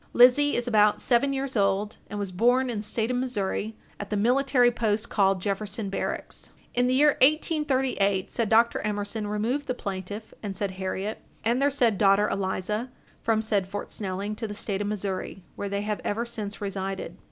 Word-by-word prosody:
Lizzie 255 +4 +6
is 240 0 -1
about 210 -3 +4
seven 255 +3 +2
years 270 -1 -2
old, 200 0 +1
and 210 - -5
was 200 -2 -3
born 245 +6 +3
in 220 - -3
the - - -5
State 220 +2 -1
of 250 - 0
Missouri, 220 -3 -2 0.2
at 205 - -6
the 210 - -1
military 250 +2 +3
post 220 -1 -1
called 195 -2 +3
Jefferson 205 0 -2
Barracks. - - -4 0.2
In 245 0 +2
the 255 - +2
year 295 +2 +6
1838, 265 - +2
said 230 -3 0
Dr. 230 +1 +4
Emerson 210 +1 -2
removed 230 +8 -1
the 255 - -1
plaintiff 200 +1 -6
and 200 -3 -5
said 200 -1 -1
Harriet 190 +3 -4 0.2
and 235 +4 +1
their 285 - +4
said 240 -7 +2
daughter 200 0 +5
Eliza 200 +5 -2 0.3
from 220 -1 +1
said 205 -4 0
Fort 205 +1 -6
Snelling 200 +1 -3
to 225 - -3
the 205 - -6
State 205 -2 -2
of 205 - -1
Missouri, 195 -2 -4
where 200 - -4
they 200 0 -1
have 210 0 -3
ever 225 +3 -1
since 215 -4 -5
resided. 195 -3 -4
210 Hz, 185 wpm, -26 LUFS, 200-245 Hz, 0.3 s, Lizzie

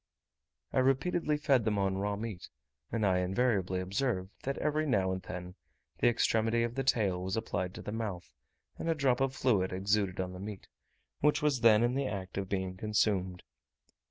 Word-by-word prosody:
I - - +3
repeatedly 150 +4 +2
fed 140 -5 +3
them 105 -1 0
on 95 -1 +1
raw 100 +1 -1
meat; 105 -4 -6 0.4
and 110 -2 0
I 95 -2 +3
invariably 95 -1 +1
observed, 95 0 -1
that 135 +1 -3
every 155 +1 0
now 95 -8 +2
and 95 0 -3
then 90 0 -7 0.5
the - - +4
extremity 115 0 +2
of 120 0 -2
the 135 +2 -2
tail 100 -8 +1
was 95 +3 -2
applied 90 -4 -2
to - - -8
the - - -5
mouth, 105 -6 -4 0.5
and 165 - -2
a 165 - +2
drop 135 -4 +2
of 135 -1 +1
fluid 105 -9 +2
exuded 100 0 0
on 90 0 -2
the 90 - -8
meat, 100 0 -7 0.5
which 150 +1 +2
was 140 -5 +2
then 115 -1 +6
in 120 +1 +2
the 135 0 0
act 95 -3 -5
of 95 -1 -4
being 95 -1 -2
consumed. 95 -3 0
105 Hz, 185 wpm, -31 LUFS, 95-125 Hz, 0.5 s, then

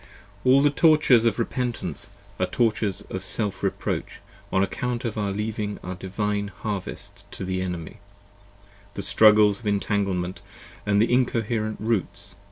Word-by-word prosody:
All 130 +2 +5
the 145 - +4
tortures 150 -7 +5
of 115 -3 +2
repentance 115 - -2 0.3
are - - +1
tortures 110 -4 +1
of 95 - -3
self 100 +2 +1
reproach - - -2 0.3
on 95 - +3
account 120 +4 -2
of 115 - -2
our 105 -2 -1
leav 105 +2 -3
10 105 - -1
ing 105 0 -4
the 90 - -4
Divine 100 +3 -2
Harvest 100 -1 -5
to - - -5
the 95 0 -2
Enemy, 90 -3 -5 1.0
the 100 - -3
struggles 105 0 +5
of 115 - -7
intanglement 100 -3 -1 0.5
with 100 +1 +4
in 125 +2 +3
coherent 110 -1 -2
roots. 100 -3 -2
105 Hz, 150 wpm, -25 LUFS, 95-115 Hz, 1.0 s, All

